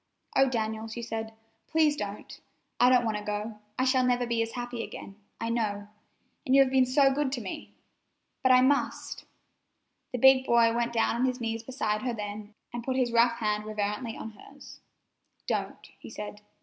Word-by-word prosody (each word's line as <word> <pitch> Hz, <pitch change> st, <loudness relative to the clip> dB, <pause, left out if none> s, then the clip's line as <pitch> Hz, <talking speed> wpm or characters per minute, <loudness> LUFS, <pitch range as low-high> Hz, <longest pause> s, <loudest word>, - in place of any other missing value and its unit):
"Oh, 270 Hz, 0 st, +5 dB
Daniel," 220 Hz, -2 st, -2 dB
she 235 Hz, +1 st, -6 dB
said, 225 Hz, -1 st, -4 dB, 0.4 s
"please 315 Hz, -2 st, +3 dB
don't! 205 Hz, -4 st, -6 dB, 0.4 s
I 245 Hz, -, +6 dB
don't 250 Hz, -1 st, +4 dB
want 220 Hz, -2 st, 0 dB
to 210 Hz, -, -6 dB
go. 210 Hz, +1 st, -4 dB, 0.2 s
I 255 Hz, -, +1 dB
shall 260 Hz, -1 st, +3 dB
never 245 Hz, -1 st, +2 dB
be 235 Hz, -1 st, 0 dB
as 225 Hz, 0 st, -3 dB
happy 245 Hz, -1 st, -4 dB
again, 195 Hz, -, -9 dB, 0.2 s
I 230 Hz, -, -2 dB
know, 205 Hz, -3 st, -2 dB, 0.5 s
and 265 Hz, -3 st, +2 dB
you 275 Hz, -, +8 dB
have 260 Hz, -, -3 dB
been 260 Hz, -1 st, +4 dB
so 270 Hz, +1 st, +4 dB
good 285 Hz, -1 st, 0 dB
to 250 Hz, -, -2 dB
me! 190 Hz, -, -7 dB, 0.7 s
But 260 Hz, -, +4 dB
I 255 Hz, 0 st, +7 dB
must——" 280 Hz, +2 st, 0 dB, 0.9 s
The 250 Hz, -, -2 dB
big 265 Hz, +1 st, +6 dB
boy 230 Hz, -1 st, +4 dB
went 235 Hz, 0 st, 0 dB
down 230 Hz, 0 st, +1 dB
on 250 Hz, -, +2 dB
his 255 Hz, 0 st, -1 dB
knees 225 Hz, -1 st, -2 dB
beside 220 Hz, -4 st, -2 dB
her 250 Hz, -2 st, -2 dB
then, 210 Hz, 0 st, -7 dB, 0.2 s
and 240 Hz, -1 st, -4 dB
put 260 Hz, +1 st, -1 dB
his 250 Hz, -2 st, +1 dB
rough 235 Hz, 0 st, +4 dB
hand 210 Hz, -2 st, -1 dB
reverently 215 Hz, +2 st, -3 dB
on 220 Hz, -, -7 dB
hers. 275 Hz, +6 st, -14 dB, 0.7 s
"Don't," -, -, -3 dB, 0.2 s
said 210 Hz, -1 st, -7 dB
he. 210 Hz, -, -33 dB
235 Hz, 190 wpm, -28 LUFS, 215-255 Hz, 0.9 s, you